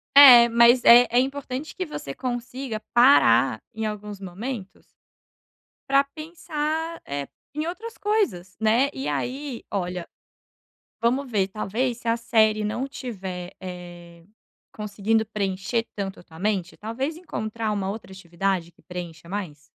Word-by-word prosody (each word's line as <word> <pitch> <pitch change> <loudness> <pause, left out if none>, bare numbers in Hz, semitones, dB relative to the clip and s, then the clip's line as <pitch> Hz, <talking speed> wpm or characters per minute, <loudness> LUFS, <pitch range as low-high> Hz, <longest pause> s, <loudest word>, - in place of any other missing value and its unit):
É, 250 -4 +11
mas 235 +1 +5
é 240 +1 +9
é 240 +2 +4
importante 270 +2 -3
que 370 - -3
você 140 - -6
consiga 245 - -4
parar 135 - +5
em 220 0 -3
alguns 210 -1 -6
momentos 195 +3 -7 1.1
para 275 +1 +5
pensar, 320 0 -3
eh, 140 0 -4 0.3
em 305 +2 -2
outras 440 +7 -6
coisas, 220 - -1
né, 225 +5 +3
e 270 - -4
aí 265 -1 -3
olha, 180 -3 -3 0.9
vamos 255 +4 +1
ver 200 -5 +1
talvez 225 +5 -2
se 235 - -9
a 230 - +3
série 220 -2 +3
não 215 +5 -2
estiver, 190 -10 -6
eh, 175 -2 -10 0.5
conseguindo 215 +1 0
preencher 205 +2 -2
tanto 195 -2 -4
a - - -14
tua 160 -2 -15
mente, 190 -3 -1
talvez 260 +9 -3
encontrar 220 -9 -4
uma 200 -2 -1
outra 210 -1 -7
atividade 180 -1 -2
que 170 - -26
preencha 170 -2 -8
mais. 180 -7 -5
220 Hz, 135 wpm, -24 LUFS, 190-260 Hz, 1.1 s, É